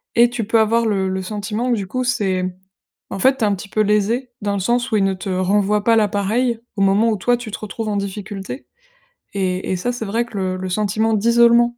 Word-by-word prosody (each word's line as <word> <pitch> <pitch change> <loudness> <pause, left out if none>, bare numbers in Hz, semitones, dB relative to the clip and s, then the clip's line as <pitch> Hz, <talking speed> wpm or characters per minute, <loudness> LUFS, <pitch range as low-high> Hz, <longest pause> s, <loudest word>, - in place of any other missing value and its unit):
et 235 +1 +6
tu 240 -2 -2
peux 225 +2 +2
avoir 230 +1 +2
le 195 -3 0
le 190 0 -2
sentiment 210 +5 -3
que - - +3
du 200 - -3
coup, 255 +7 -3
c'est, 205 -7 0
mmh, 185 - -1 0.6
en - - -4
fait 265 +6 +4
tu 235 - -2
es - - +4
un 205 - +2
petit 200 +2 -10
peu 215 - +1
lésée 215 +5 +1
dans 205 0 -1
le 200 - -1
sens 240 +6 0
où 215 - +3
ils 200 - +2
ne 195 0 +1
te 185 +1 -6
renvoient 200 +3 +1
pas 230 +1 +4
la 215 -2 +4
pareille 225 +4 0 0.2
au 200 - -2
moment 200 +4 +4
où 215 - 0
toi 245 +6 +1
tu 235 -3 -8
te - - -5
retrouves 215 +1 -5
en 205 - -1
difficulté 200 +3 -6 0.7
et 185 -2 -1
et - - +1
ça 245 +7 -1
c'est 245 -2 -5
vrai 225 +4 -1
que 230 -3 -9
le 185 -1 -1
le 185 0 -4
sentiment 215 +3 0
d'isolement, 235 +2 +4
210 Hz, 255 wpm, -20 LUFS, 195-235 Hz, 0.7 s, et